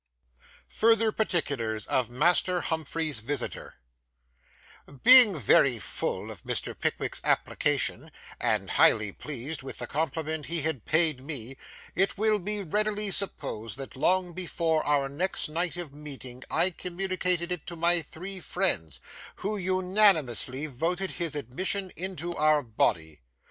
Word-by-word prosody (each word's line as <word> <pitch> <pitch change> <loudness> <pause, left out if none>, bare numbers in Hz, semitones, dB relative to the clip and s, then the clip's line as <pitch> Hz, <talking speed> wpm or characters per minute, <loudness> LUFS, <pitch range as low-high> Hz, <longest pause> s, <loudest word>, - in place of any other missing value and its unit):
FURTHER 225 0 +2
PARTICULARS 140 - -1
OF 125 -3 0
MASTER 175 +7 +2
HUMPHREY'S 160 -3 -2
VISITOR 125 +3 -5 1.3
Being 250 -8 +9
very 130 0 +3
full - - -3
of - - -11
Mr. - - -2
Pickwick's - - -2
application, - - 0 0.3
and - - -1
highly 105 -2 +4
pleased 145 +6 -5
with 135 - -8
the - - -5
compliment 160 0 -3
he 165 -2 -1
had 155 -7 -2
paid 155 -4 +2
me, 135 -3 -5 0.4
it 195 +4 +1
will 215 0 +2
be 205 +2 -1
readily 210 +3 0
supposed 115 - -1
that 135 0 -7
long 180 +5 +1
before 165 -3 -1
our 145 -2 +1
next 160 +5 -1
night 170 +2 -2
of 170 -6 -7
meeting 135 -4 -8
I 185 - +2
communicated 180 -1 -1
it 180 -4 -5
to 170 - -5
my 170 +1 +3
three 185 +5 -7
friends, 175 - -1 0.3
who 210 +2 -3
unanimously 185 - +3
voted 170 +7 -2
his 170 -4 -3
admission 185 - -2
into 175 -1 -4
our 155 -1 +2
body. 80 - -1
160 Hz, 130 wpm, -27 LUFS, 135-185 Hz, 1.3 s, Being